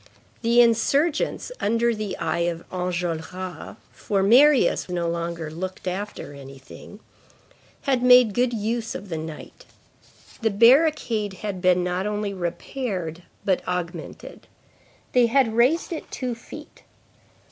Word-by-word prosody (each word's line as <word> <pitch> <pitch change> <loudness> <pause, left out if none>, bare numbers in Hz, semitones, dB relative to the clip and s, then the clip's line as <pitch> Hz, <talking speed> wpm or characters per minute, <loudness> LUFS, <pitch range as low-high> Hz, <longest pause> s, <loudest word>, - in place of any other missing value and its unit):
The 235 +1 +5
insurgents 280 - +1
under 230 +2 +1
the 210 -3 -4
eye 170 +2 0
of 170 0 -7
Enjolras, 180 -1 -4 0.2
for 195 -2 -1
Marius 255 +2 +5
no 175 -1 -1
longer 170 -1 -3
looked 185 +3 -6
after 190 -4 -5
anything, 135 +8 -12 0.8
had 265 -3 +1
made 250 -3 +6
good 245 +2 +1
use 230 +1 -2
of 200 - -7
the 165 - -3
night. 160 -1 -9 0.8
The 225 - +2
barricade 230 -2 +3
had 195 -3 -4
been 180 -1 +3
not 180 +2 -1
only 210 -1 -2
repaired, 180 -1 -4 0.2
but 190 -2 +1
augmented. 180 -2 -6 0.6
They 245 -2 +4
had 240 -2 +2
raised 260 +10 +2
it 320 - -7
two 250 -2 -3
feet. 230 - -12
205 Hz, 125 wpm, -24 LUFS, 175-235 Hz, 0.8 s, made